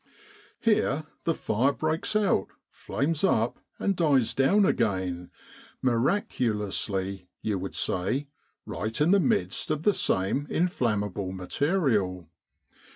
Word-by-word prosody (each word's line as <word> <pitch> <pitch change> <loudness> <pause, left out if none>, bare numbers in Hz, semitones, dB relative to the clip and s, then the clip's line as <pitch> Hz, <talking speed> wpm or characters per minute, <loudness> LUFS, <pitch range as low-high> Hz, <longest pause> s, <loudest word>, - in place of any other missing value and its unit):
Here 180 - +2 0.2
the 165 - +2
fire 125 +7 +1
breaks 155 +7 -1
out, 205 - +2 0.2
flames 155 +4 -2
up, 115 - +2 0.2
and 195 - 0
dies 145 -9 +3
down 195 +10 +4
again 95 - 0 0.5
miraculously, 105 - 0 0.2
you 105 -3 -1
would 95 +1 -5
say 125 +11 0 0.4
right 110 +1 -4
in 155 +4 +4
the 200 - +6
midst 215 +2 0
of 155 0 -1
the 205 - +4
same 95 - 0
inflammable 105 - -1
material. 100 - 0
125 Hz, 110 wpm, -27 LUFS, 95-160 Hz, 0.5 s, the